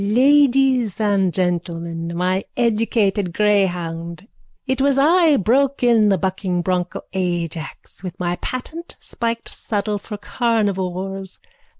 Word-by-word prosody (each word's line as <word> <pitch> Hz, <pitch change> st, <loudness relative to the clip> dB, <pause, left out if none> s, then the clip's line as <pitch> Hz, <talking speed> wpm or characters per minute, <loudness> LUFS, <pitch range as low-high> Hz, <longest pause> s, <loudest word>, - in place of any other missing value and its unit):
_ 205 Hz, +2 st, -1 dB
Ladies 265 Hz, -5 st, +4 dB
and 200 Hz, -3 st, +2 dB
gentlemen, 170 Hz, -2 st, -2 dB
my 185 Hz, +2 st, 0 dB
educated 215 Hz, -5 st, +1 dB
greyhound. 180 Hz, -4 st, 0 dB, 0.4 s
It 260 Hz, -1 st, -1 dB
was 275 Hz, 0 st, +3 dB
I 320 Hz, +1 st, +4 dB
broke 265 Hz, +6 st, +1 dB
in 230 Hz, -3 st, +4 dB
the 195 Hz, -, +3 dB
bucking 185 Hz, -1 st, -2 dB
broncho 180 Hz, 0 st, -2 dB
Ajax 175 Hz, -2 st, -4 dB
with 180 Hz, 0 st, -7 dB
my 175 Hz, 0 st, -1 dB
patent 310 Hz, -, -6 dB
spiked 230 Hz, -1 st, -4 dB
saddle 210 Hz, -1 st, -2 dB
for 210 Hz, +1 st, -7 dB
carnivores. 195 Hz, -4 st, -2 dB
200 Hz, 115 wpm, -20 LUFS, 180-235 Hz, 0.4 s, Ladies